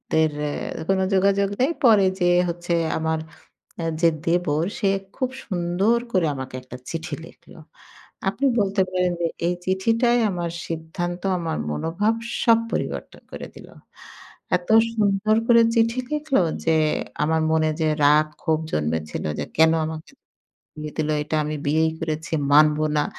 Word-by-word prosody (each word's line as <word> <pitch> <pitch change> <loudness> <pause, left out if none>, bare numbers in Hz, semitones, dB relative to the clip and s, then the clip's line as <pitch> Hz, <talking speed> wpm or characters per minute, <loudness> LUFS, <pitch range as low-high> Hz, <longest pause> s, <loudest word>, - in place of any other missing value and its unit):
দেড় 160 -1 +2 0.4
অ্যা - - -6
কোন 195 0 +2
যোগাযোগ 200 +1 +3
নেই। 260 +5 +3
পরে 215 -5 +6
যেয়ে 175 0 +4
হচ্ছে 175 0 -2 0.2
আমার 160 0 -1 0.8
যে 170 - +6 0.2
দেবর, 165 -2 +1
সে 210 - +1 0.3
খুব 255 - -1 0.2
সুন্দর 185 +4 +1
করে 185 -5 +2
আমাকে 130 -1 -6
একটা 125 0 -10
চিঠি 165 0 -5
লিখল। - - -17 0.8
আপনি 270 +8 -2
বলতে 200 -1 +1
পারেন 180 -1 +1
যে, 170 - +2 0.2
এই 175 - +1
চিঠিটাই 230 +6 +2
আমার 175 -2 -3 0.2
সিদ্ধান্ত, 170 +2 -4 0.2
আমার 165 -1 -3
মনোভাব, 170 - 0 0.3
সব 230 -1 +5
পরিবর্তন - - -4
করে - - -7
দিল। - - -12 0.9
এত 175 +2 -17 0.3
সুন্দর 210 0 +2
করে 235 -1 +6
চিঠি 230 +2 +2
লিখলো 300 -6 +1 0.2
যে, 165 -1 +3 0.5
আমার 160 +1 +1
মনে 160 0 +2
যে 155 - +2 0.2
রাগ, 150 +1 +5 0.2
ক্ষোভ 160 -1 +1
জন্মেছিল 75 0 -2
যে 75 - -2
"কেন 160 +1 +6
আমাকে 160 - -7 0.7
বিয়ে 150 -1 -6
দিলো? 155 0 0
এটা 155 +1 -2
আমি 150 +1 -3
বিয়েই 160 +2 +2
করেছি, 160 -1 -4 0.2
মানবো 150 +1 +5
না।" 150 - +2
170 Hz, 145 wpm, -23 LUFS, 155-195 Hz, 0.9 s, পরে